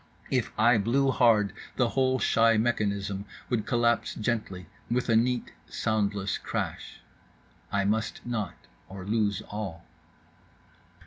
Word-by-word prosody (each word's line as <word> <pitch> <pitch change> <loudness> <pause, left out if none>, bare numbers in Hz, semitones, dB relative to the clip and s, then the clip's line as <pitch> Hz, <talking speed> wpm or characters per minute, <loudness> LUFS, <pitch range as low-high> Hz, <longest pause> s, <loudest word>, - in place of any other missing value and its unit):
If - - +1
I 120 +1 +5
blew 135 +6 +2
hard 110 -5 +4 0.2
the 120 -3 +2
whole 130 0 +2
shy 115 -2 +4
mechanism 100 -3 0 0.3
would 110 -3 0
collapse 120 -1 +1
gently 105 -5 -2 0.2
with 120 +1 0
a 115 - +4
neat 120 +2 +1 0.2
soundless 100 -2 -1
crash. - - -4 0.7
I 100 -1 +1
must 110 +2 -1
not, 110 -6 -3 0.3
or 95 -1 -8
lose 105 -1 0
all. 95 -6 -5
110 Hz, 120 wpm, -28 LUFS, 100-120 Hz, 0.7 s, I